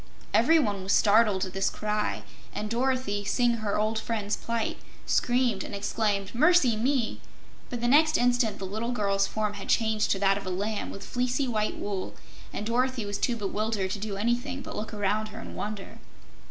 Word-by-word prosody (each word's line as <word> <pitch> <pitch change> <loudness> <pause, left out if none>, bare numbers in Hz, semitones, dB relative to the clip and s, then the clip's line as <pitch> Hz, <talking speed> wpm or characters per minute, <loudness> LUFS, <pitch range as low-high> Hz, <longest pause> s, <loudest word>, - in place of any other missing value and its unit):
Everyone 245 -12 +3
was 190 +1 0
startled 210 -2 +4
at 185 - -8
this 195 0 +1
cry, 210 0 -2 0.3
and 210 +1 -3
Dorothy, 245 -4 0
seeing 240 +3 +2
her 215 -2 -1
old 215 +1 +1
friend's 215 -2 -2
plight, 230 -1 -3 0.3
screamed 240 -5 +1
and - - -6
exclaimed: 200 -1 -1
"Mercy 295 -2 +4
me!" 245 +1 0 0.5
But 240 -2 -4
the 240 - +1
next 310 +4 +5
instant 245 -2 +2
the 195 - -5
little 220 +5 -3
girl's 200 -3 +1
form 215 -1 -2
had 200 -1 -8
changed 220 -2 +2
to - - +2
that 195 0 +3
of 195 - -9
a - - -1
lamb 205 +4 -2
with 195 0 -8
fleecy 250 +2 0
white 215 -3 -1
wool, 200 -2 -4 0.4
and 210 - -4
Dorothy 250 0 0
was 205 0 -3
too 240 - +1
bewildered 210 -2 -2
to 205 - -3
do 205 -1 -4
anything 245 +6 -1
but - - -7
look 215 - -4
around 210 0 0
her 215 +1 -9
in - - -8
wonder. 205 -2 -6
215 Hz, 185 wpm, -28 LUFS, 205-240 Hz, 0.5 s, next